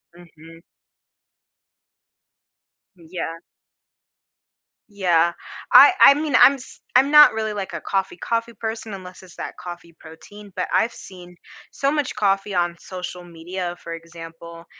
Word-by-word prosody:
Mhm. 165 -1 -16 2.4
Yeah. 165 -1 -7 1.5
Yeah. 170 -4 +1 0.4
I - - +9
I - - +9
mean, 295 -2 -2
I'm 275 - +8
s 265 -2 -12
I'm 265 +3 +4
not 300 0 +8
really, 220 -1 -3
like, 195 -3 -6
a 170 - -5
coffee, 195 -2 -3
coffee 230 +4 -3
person 220 0 -6
unless 185 -1 -10
it's 180 -2 -16
that - - -6
coffee 175 -1 -10
protein, 205 +6 -14
but - - -2
I've 230 - +2
seen 180 -2 -13 0.4
so 275 0 -1
much 295 -3 -2
coffee 195 0 0
on 175 -1 0
social 180 -1 -8
media, 175 +1 -6
for 170 - -7
example, 165 0 -11
180 Hz, 130 wpm, -21 LUFS, 170-220 Hz, 2.4 s, I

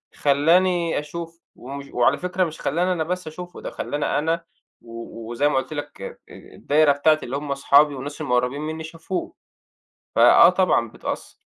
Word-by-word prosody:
خلّاني 170 +4 +2
أشوفه 165 +3 -8 0.2
ومش 140 +2 -8
وعلى 125 +3 +3
فكرة 180 +1 -1
مش 160 -3 -5
خلّاني 175 +6 0
أنا 165 -3 -1
بس 180 +1 -4
أشوفه 175 +3 -9
ده، - - -5
خلّاني 145 0 -3
أنا 165 +3 -1 0.4
و 115 -1 -9
وزي 145 +5 +1
ما - - -1
قُلت 130 +3 -2
لك 145 -1 -7
أ - - -7
الدايرة 150 0 +1
بتاعتي 155 +2 +2
اللي 130 +3 -3
هُم 145 -1 -3
صحابي 140 +1 +4
والناس 145 +3 -7
اللي 150 - -5
مقربين 125 +3 +1
مني 160 +1 -5
شافوه. 170 - -5 0.8
فآه - - +8
طبعًا 180 - +1
بتأثّر. - - -6
150 Hz, 165 wpm, -23 LUFS, 140-170 Hz, 0.8 s, فآه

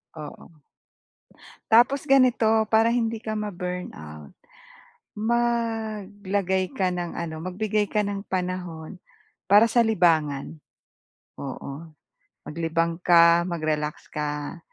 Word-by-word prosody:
Oo. 155 0 -11 1.1
Tapos 245 +5 +5
ganito 240 -5 +3
para 225 +2 +3
hindi 230 -2 -1
ka 220 -1 -3
ma-burnout, 180 - -6 0.9
maglagay 215 -5 -1
ka 190 -9 0
ng 175 -1 -4
ano, 165 -2 -4
magbigay 210 +3 -1
ka 210 - +1
ng 200 0 -4
panahon, 180 -2 -4 0.5
para 205 +3 +7
sa 235 +1 +3
libangan. 160 -8 +1 0.8
Oo, 140 +3 -7 0.5
maglibang 165 +1 -1
ka, 170 -1 +6
mag-relax 155 -3 -3
ka, 150 +1 -4
185 Hz, 95 wpm, -25 LUFS, 165-220 Hz, 1.1 s, para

